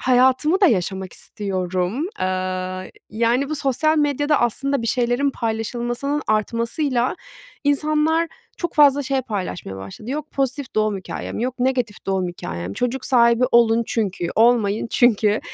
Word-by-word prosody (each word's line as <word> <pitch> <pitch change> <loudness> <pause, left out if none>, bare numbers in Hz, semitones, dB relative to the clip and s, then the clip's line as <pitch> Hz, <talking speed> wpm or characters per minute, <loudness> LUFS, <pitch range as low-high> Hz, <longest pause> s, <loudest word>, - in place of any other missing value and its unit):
hayatımı 260 - +3
da 390 - +7
yaşamak 190 - 0
istiyorum. 190 - -3
Aaa, 185 0 -2 0.3
yani, 235 +5 +1
bu 310 - 0
sosyal 305 +4 +1
medyada 290 +1 +2
aslında 270 +3 0
bir - - -3
şeylerin 245 +3 +1
paylaşılmasının 240 +5 -2
artmasıyla 235 +4 0 0.5
insanlar 305 +3 +2 0.3
çok 345 - -3
fazla 285 -1 +5
şey 270 0 0
paylaşmaya 185 - -5
başladı. 95 - -8
Yok 300 +2 -4
pozitif 270 0 -2
doğum 215 -1 +1
hikâyem, 185 - -6
yok 250 +2 -2
negatif 250 -6 -1
doğum 190 -2 0
hikâyem, 90 - -6
çocuk 250 - -2
sahibi 235 -1 +4
olun 235 -1 +5
çünkü, 190 -6 -2
olmayın 225 -2 +3
çünkü. 215 -3 +3
240 Hz, 130 wpm, -21 LUFS, 205-275 Hz, 0.5 s, da